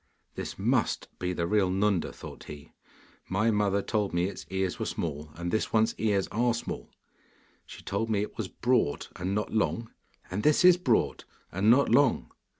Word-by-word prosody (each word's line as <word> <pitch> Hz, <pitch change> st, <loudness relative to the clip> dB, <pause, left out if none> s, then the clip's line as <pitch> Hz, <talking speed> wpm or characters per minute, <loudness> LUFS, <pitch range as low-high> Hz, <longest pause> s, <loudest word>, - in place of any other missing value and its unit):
'This -, -, -6 dB
MUST -, -, 0 dB
be 90 Hz, 0 st, -1 dB
the 85 Hz, -1 st, -1 dB
real 95 Hz, +1 st, +2 dB
Nunda,' 95 Hz, -1 st, +1 dB
thought -, -, -11 dB
he. 75 Hz, -1 st, -10 dB, 0.6 s
'My 105 Hz, +5 st, +2 dB
mother 100 Hz, -1 st, +1 dB
told 105 Hz, -5 st, -1 dB
me 85 Hz, 0 st, +2 dB
its 100 Hz, -, -6 dB
ears 95 Hz, -1 st, -2 dB
were -, -, -1 dB
small, 75 Hz, -2 st, -4 dB
and 85 Hz, +1 st, -4 dB
this 110 Hz, -, 0 dB
one's 110 Hz, 0 st, +3 dB, 0.4 s
are 120 Hz, +2 st, +2 dB
small. 115 Hz, -, -6 dB, 0.8 s
She -, -, -11 dB
told 105 Hz, +3 st, -2 dB
me 105 Hz, -2 st, +1 dB
it -, -, -7 dB
was 110 Hz, -4 st, -3 dB
broad 120 Hz, -, 0 dB
and 95 Hz, +3 st, -2 dB
not 105 Hz, -, -2 dB
long, 115 Hz, +1 st, 0 dB, 0.4 s
and 95 Hz, +3 st, -2 dB
this 150 Hz, -, +4 dB
is 180 Hz, -1 st, +8 dB
broad 130 Hz, -10 st, +1 dB, 0.3 s
and 95 Hz, +4 st, +2 dB
not 135 Hz, +4 st, +5 dB
long. 120 Hz, -, +3 dB
105 Hz, 175 wpm, -28 LUFS, 90-115 Hz, 0.8 s, is